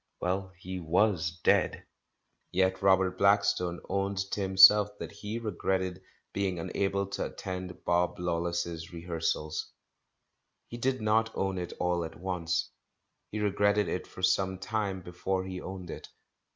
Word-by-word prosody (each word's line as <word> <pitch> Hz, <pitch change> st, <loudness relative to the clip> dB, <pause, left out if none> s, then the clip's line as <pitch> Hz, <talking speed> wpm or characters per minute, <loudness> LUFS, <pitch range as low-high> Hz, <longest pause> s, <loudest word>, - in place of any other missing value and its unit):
Well, 95 Hz, +1 st, -1 dB
he 95 Hz, +1 st, -6 dB
was 90 Hz, 0 st, +2 dB
dead. -, -, +2 dB, 0.7 s
Yet 95 Hz, +1 st, +1 dB
Robert 95 Hz, -1 st, +3 dB
Blackstone 100 Hz, -3 st, +3 dB
owned 100 Hz, 0 st, -1 dB
to 105 Hz, -, -1 dB
himself 100 Hz, +2 st, +7 dB
that -, -, -6 dB
he 105 Hz, +2 st, -5 dB
re 115 Hz, -2 st, -3 dB
gretted 95 Hz, 0 st, -1 dB, 0.3 s
being 95 Hz, -2 st, -1 dB
unable 100 Hz, +3 st, -1 dB
to 100 Hz, 0 st, -3 dB
attend 90 Hz, -1 st, -6 dB
Bob 90 Hz, 0 st, +2 dB
Lawless's 85 Hz, -1 st, -2 dB
re 85 Hz, -1 st, -8 dB
hearsals. 80 Hz, -2 st, -2 dB, 1.0 s
He 120 Hz, -, -6 dB
did 130 Hz, 0 st, 0 dB
not 110 Hz, +1 st, +3 dB
own 95 Hz, -1 st, -1 dB
it 90 Hz, -, -5 dB
all 90 Hz, -1 st, +1 dB
at 80 Hz, 0 st, -8 dB
once, 85 Hz, -3 st, -1 dB, 0.6 s
he 105 Hz, -, -3 dB
re 105 Hz, -1 st, +2 dB
gretted 100 Hz, +1 st, +2 dB
it 90 Hz, -, -3 dB
for 95 Hz, -, -11 dB
some 95 Hz, +1 st, +2 dB
time 95 Hz, -1 st, -2 dB
before 95 Hz, +2 st, -2 dB
he 95 Hz, -1 st, -6 dB
owned 90 Hz, -2 st, -7 dB
it. -, -, -8 dB
95 Hz, 150 wpm, -30 LUFS, 90-100 Hz, 1.0 s, himself